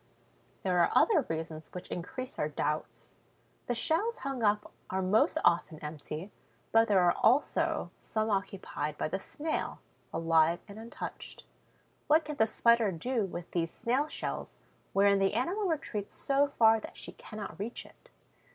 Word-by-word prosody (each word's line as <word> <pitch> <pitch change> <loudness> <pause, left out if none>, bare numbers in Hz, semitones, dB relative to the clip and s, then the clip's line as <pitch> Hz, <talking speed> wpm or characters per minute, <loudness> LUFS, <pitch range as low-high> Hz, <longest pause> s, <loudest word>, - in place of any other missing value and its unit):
There 180 -2 +2
are - - +5
other 370 -11 +4
reasons 160 -1 -4
which 180 - -6
increase 255 +9 -5
our 150 - +1
doubts. 150 +1 -3 0.6
The 245 - 0
shells 400 - +1
hung 270 -3 -2
up 210 -1 +1 0.2
are 190 - -1
most 195 +4 +3
often 170 -2 +3
empty; 155 +5 -6 0.4
but 225 0 +5
there 195 -3 +4
are 175 -1 +5
also 260 +6 +2
some 220 0 -1
occupied 190 -6 -2
by - - -1
the 190 - -2
Snail, 310 +10 -3 0.3
alive 165 0 +3
and 205 +1 -10
untouched. 230 +1 -8 0.6
What 310 +2 +4
can 300 -1 -5
the 220 - +4
Spider 235 -2 +3
do 225 +6 -1
with 175 -2 -7
these 165 -2 0
snail 255 +6 0
shells - - -5 0.3
wherein 200 0 +4
the 195 +1 +2
animal 360 - 0
retreats 260 - -3
so 280 +1 +2
far 225 -5 +5
that - - -10
she - - -6
cannot 215 -3 -8
reach 225 +4 -5
it? - - -20
210 Hz, 155 wpm, -31 LUFS, 175-250 Hz, 0.6 s, are